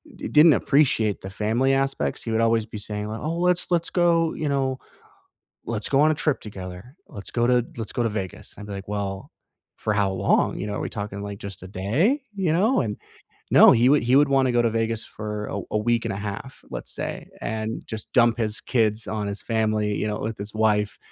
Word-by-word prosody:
d - - -6
didn't 150 +1 +7
appreciate 125 -10 +2
the 95 - -7
family 110 +7 +1
aspects. 135 - -1
He 115 - -4
would 110 0 +1
always 115 -1 +2
be 110 - -8
saying 105 0 -4
li 110 +1 -4
"Oh, 160 +2 -2
let's 180 0 +1
let's 170 -1 +1
go, 170 -2 +3
you 150 - -2
know, 135 -2 0 0.9
let's - - -2
go 135 - +3
on 155 +1 +5
a - - 0
trip 150 -1 0
together, 95 +3 -9
let's 100 - -8
go 120 0 +2
to 125 -1 +3
let's 115 -2 -4
go 120 - 0
to - - +2
Vegas," 95 -4 -5
I'd 105 - -9
be 105 - -7
like, 100 0 -6
"Well, 100 -2 -4 0.5
for 105 - -1
how 100 -2 +1
long? 95 - +1
You 105 - -3
know, 100 - -3
are - - -3
we - - -2
talking, 100 -1 -5
like, 100 -1 -6
just 100 -3 -8
a - - -9
day?" 135 - +1
You 185 -5 +1
know? 210 +10 +3
And 105 -5 -2 0.6
no, - - +9
he 120 +2 +4
would 145 +2 +4
he 125 +2 +3
would 145 0 +5
wanna 135 -2 +3
go 120 - +3
to 115 - +3
Vegas 115 0 -1
for 105 -1 -5
a 100 - -4
a 105 - +2
week 115 +2 +1
and 115 - -2
a - - -4
half, 100 +6 -6
let's - - -5
say, - - -4
and 110 0 -3
just 110 -1 -7
dump 120 -2 +4
his 110 -2 -1
kids 110 -3 0
on 105 -2 -3
his 100 0 -5
family, 110 -2 0
you 105 - -1
know, 105 0 -2
with 110 0 -3
his 100 +1 -7
wife 105 -1 +1
110 Hz, 230 wpm, -24 LUFS, 105-135 Hz, 0.9 s, no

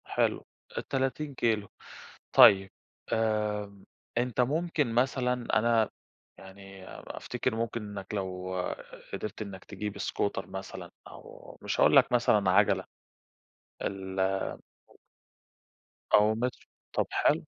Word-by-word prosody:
حلو، - - 0 0.4
30 135 +2 -1
كيلو. 110 -5 +1 0.7
طيب 95 -1 +8 0.4
آمم، 105 -3 -1 0.3
أنت 125 0 +1
ممكن 150 -1 0
مثلًا 125 0 +2 0.3
أنا 115 -1 +3 0.5
يعني 95 0 -12
أفتكر 125 -1 -4
ممكن 115 0 -2
إنك 105 -1 -7
لو 95 -2 -3 0.6
قدرت 105 0 -5
إنك 100 -3 -7
تجيب 105 -1 -5
scooter 100 -1 -2
مثلًا 95 -2 -7 0.2
أو - - -13
مش - - -2
هاقول - - +6
لك - - +6
مثلًا 105 -5 +3
عجلة. 95 - +3 1.0
ال 95 -1 -4 2.0
أو 105 +1 +6
مترو 125 +2 -3 0.3
طب - - +1
حلو. - - +2
105 Hz, 100 wpm, -29 LUFS, 95-120 Hz, 2.0 s, طيب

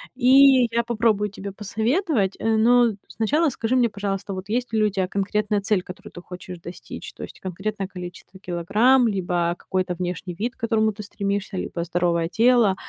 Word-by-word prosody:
И 260 0 +6
я 235 0 +1
попробую 220 -3 +1
тебе 200 0 -7
посоветовать, 220 - 0
э, 225 0 +1
но 235 0 +4
сначала 295 +9 +1
скажи 235 0 -1
мне, 240 -1 +4
пожалуйста, 200 -1 -4
вот 190 +2 -7
есть 240 +1 -2
ли 220 -1 +2
у 210 - +3
тебя 190 -2 -1
конкретная 205 +2 -1
цель, 200 -2 +1
которую 180 - -11
ты 175 - -10
хочешь 180 -1 -9
достичь, 175 +1 -9
то - - -9
есть - - -10
конкретное 195 +2 -4
количество 180 0 -10
килограмм, 210 +9 +3
либо 175 -4 0
какой-то 185 -1 -2
внешний 180 0 -4
вид, 235 +8 -3
к - - -40
которому 220 -1 +1
ты 210 0 -9
стремишься, 200 0 -3
либо 170 -1 -3
здоровое 170 -1 0
тело. 230 -1 +4
205 Hz, 175 wpm, -23 LUFS, 185-230 Hz, -, И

